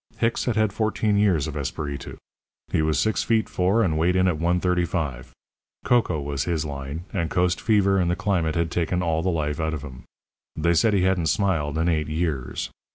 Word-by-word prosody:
Hicks 115 0 0
had 120 - 0
had 110 -3 +1
fourteen 110 -1 0
years 100 -8 +3
of 80 -2 -5
Esperitu. 70 0 -5 0.5
He - - +2
was 80 -2 +1
six 110 +8 +1
feet 110 -2 +1
four 95 +6 +2
and 80 -5 0
weighed 90 +3 +2
in 95 0 +3
at 85 -4 0
135. 85 -6 -1 0.5
Cocoa 115 -10 +2
was 70 -2 -3
his 80 -3 -1
line; 70 +2 -5
and 85 -6 -1
coast 90 +1 +1
fever 100 -3 +3
and 85 -2 +1
the 85 - +1
climate 90 -6 0
had 85 0 0
taken 90 +1 0
all 80 -2 0
the 95 - 0
life 75 -3 -1
out 80 0 -1
of 75 - -7
him. 65 -4 -10 0.5
They 85 +2 +2
said 105 +6 +3
he 95 - +2
hadn't 95 -3 +1
smiled 80 -4 0
in 80 +1 +1
eight 80 -3 +1
years. 75 -5 -2
85 Hz, 200 wpm, -24 LUFS, 75-95 Hz, 0.5 s, years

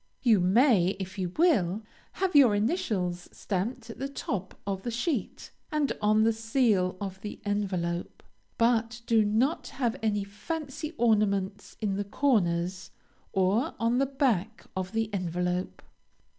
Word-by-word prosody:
You 225 -5 +5
may, 195 0 +4
if 190 +1 -6
you 180 -2 -2
will, 220 - +3 0.3
have 380 -4 -1
your 255 -7 +7
initials 205 - -1
stamped 225 +5 -3
at - - -12
the 270 - -2
top 200 -8 -4
of 195 -1 -2
the 240 - -4
sheet, 240 - -3 0.2
and 300 -4 +1
on 215 +1 +4
the 225 0 +3
seal 220 -5 +1
of 190 -1 -6
the 210 - -7
envelope, 185 -4 -2 0.3
but 230 0 +2
do 225 -2 +4
not 230 +10 +1
have 240 -4 -2
any 210 -2 +1
fancy 305 +9 -5
ornaments 205 -3 +1
in 200 -3 0
the 205 - -1
corners, 185 -6 0 0.4
or 195 +6 +1
on 230 +2 +2
the 275 - +2
back 235 -6 0
of 185 0 -3
the 220 -1 -1
envelope. 180 -1 -2
210 Hz, 145 wpm, -28 LUFS, 190-240 Hz, 0.4 s, your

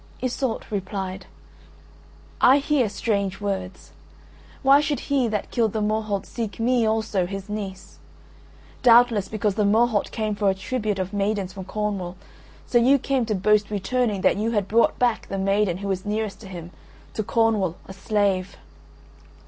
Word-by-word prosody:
Iseult 255 -1 -2
replied: 190 -1 -4 1.1
"I 265 +3 +7
hear 280 -5 +1
strange 200 -2 -1
words. 190 -2 -4 0.7
Why 275 +2 +6
should 295 -1 -1
he 275 -4 +1
that 210 -2 -3
killed 225 -4 +1
the 220 - -1
Morholt 215 -1 -1
seek 220 -5 -5
me 235 0 +2
also, 215 -4 0
his 195 +1 -6
niece? 195 -3 -6 0.8
Doubtless 235 -4 +5
because 210 -1 -1
the 210 +1 0
Morholt 215 +1 +2
came 215 -2 -2
for 205 -1 +1
a 190 - +1
tribute 210 +1 -2
of 190 +1 -3
maidens 200 -2 -1
from 190 0 -8
Cornwall, 195 -4 -3 0.5
so 240 - +3
you 260 +4 +5
came 265 -3 -1
to 215 - 0
boast 210 +2 +2
returning 210 +1 -1
that - - +3
you 215 +2 0
had 205 -4 0
brought 230 +3 +3
back 245 -2 +1
the 195 - -4
maiden 195 -1 +1
who 200 +1 -5
was 190 -1 -2
nearest 210 -1 -3
to 215 - -11
him, 175 -2 -8 0.4
to - - -2
Cornwall, 215 -5 +1
a 190 - -8
slave." 195 -1 0
210 Hz, 160 wpm, -24 LUFS, 195-230 Hz, 1.1 s, I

